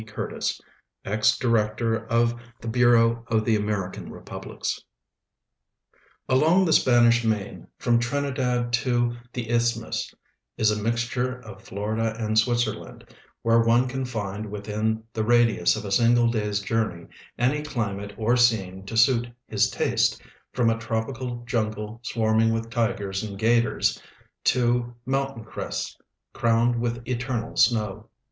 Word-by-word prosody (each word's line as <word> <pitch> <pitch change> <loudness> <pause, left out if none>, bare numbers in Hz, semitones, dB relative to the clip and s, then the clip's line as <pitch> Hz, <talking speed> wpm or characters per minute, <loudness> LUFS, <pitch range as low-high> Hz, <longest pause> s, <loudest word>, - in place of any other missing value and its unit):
Curtis, 105 - -3 0.5
Ex 105 +2 +2
Director 115 -1 0
of 115 0 +2 0.3
the 115 - -8
Bureau 115 -1 +4
of 110 -1 +1
the 115 - +3
American 105 -3 -3
Republics - - -5 1.5
Along 160 +8 +4
the 160 - +2
Spanish 120 -1 +5
main, 110 -3 -2
from 120 -1 +2
Trinidad 125 -2 -1
to 120 0 +1 0.2
the 115 -2 -4
isthmus, 115 -1 0 0.5
is 110 -1 +3
a 105 0 -2
mixture 125 +3 -1
of 105 -4 -11
Florida 110 +1 -2
and 110 -1 -2
Switzerland, 120 -1 -2 0.3
where 115 0 +4
one 115 +2 +3
can 130 +1 -3
find 105 -4 -4
'wdthin 105 +2 -2
the 110 - -1
radius 115 -5 +3
of 110 0 -6
a 100 - -5
single 120 +3 +4
day's 105 -3 -1
journey 105 -5 -2 0.3
any 130 +5 +1
climate 105 -8 -4
or 115 +2 +2
scene 100 -6 +2
to 115 - -4
suit 120 0 +4 0.2
his 105 -1 +1
taste, - - +1 0.3
from 120 -2 +2
a 115 - -2
tropical 120 +2 -3
jungle 110 -1 -3
swai'ining 115 -1 +2
with 115 0 -3
tigers 100 -4 -1
and 105 -3 -6
'gators 115 +3 +2 0.4
to 120 -1 +1
mountain 135 -2 -2
crests - - -5 0.4
crowned 115 +1 +2
with 120 0 -3
eternal 125 -2 -3
snow. 110 -1 +1
115 Hz, 130 wpm, -25 LUFS, 110-120 Hz, 1.5 s, Spanish